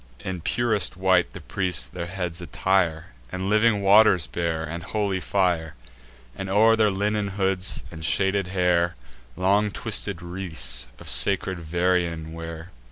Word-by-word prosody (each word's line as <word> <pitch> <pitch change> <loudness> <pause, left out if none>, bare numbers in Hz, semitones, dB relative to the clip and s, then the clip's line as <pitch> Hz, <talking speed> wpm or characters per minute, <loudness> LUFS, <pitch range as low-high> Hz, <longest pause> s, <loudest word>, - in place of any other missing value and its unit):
In 95 -2 -5
purest 110 -1 0
white 95 -1 +2
the - - -8
priests 90 -5 +2
their 85 -1 -6
heads 90 -2 -4
attire; 90 -3 0 0.2
And 95 +2 -3
living 105 -1 +3
waters 100 -4 +5
bear, 80 +4 -3
and 85 +2 -5
holy 100 0 -2
fire; 90 -5 -1 0.6
And, 95 - -6
o'er 110 +3 +5
their 110 -2 +3
linen 105 +1 -1
hoods 95 -1 0
and 80 -1 -9
shaded 95 +3 +1
hair, 90 -2 +1 0.4
Long 100 +3 +2
twisted 100 -4 -2
wreaths 80 -9 -3
of - - -13
sacred 95 -2 +3
vervain 85 -1 -1
wear. 80 +1 -8
95 Hz, 140 wpm, -24 LUFS, 85-100 Hz, 0.6 s, waters